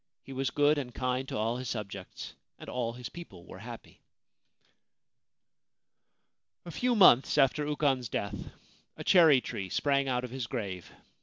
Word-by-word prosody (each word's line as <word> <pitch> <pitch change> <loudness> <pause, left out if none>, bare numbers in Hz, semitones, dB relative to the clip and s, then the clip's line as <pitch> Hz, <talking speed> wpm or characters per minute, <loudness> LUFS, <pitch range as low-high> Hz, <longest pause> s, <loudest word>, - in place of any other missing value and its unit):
He 135 - -10
was 135 +1 -1
good 145 +1 +3
and 125 -4 -7
kind 125 +1 -1
to - - -4
all 115 +3 -1
his 130 -1 -5
subjects, 100 -4 -6 0.2
and - - -12
all 120 -2 -2
his 125 -1 -7
people 170 - -11
were - - -11
happy. - - -11 2.6
A 170 - -7
few 245 +9 0
months 150 - +6
after 145 +1 +3
Ukon's 140 -5 0
death, 100 -1 -4 0.5
a - - -6
cherry 160 -8 +6
tree 95 -5 -5
sprang 140 +5 +1
out 125 -1 0
of 125 - -6
his 130 -3 -4
grave. 100 -8 -5
130 Hz, 155 wpm, -30 LUFS, 115-145 Hz, 2.6 s, months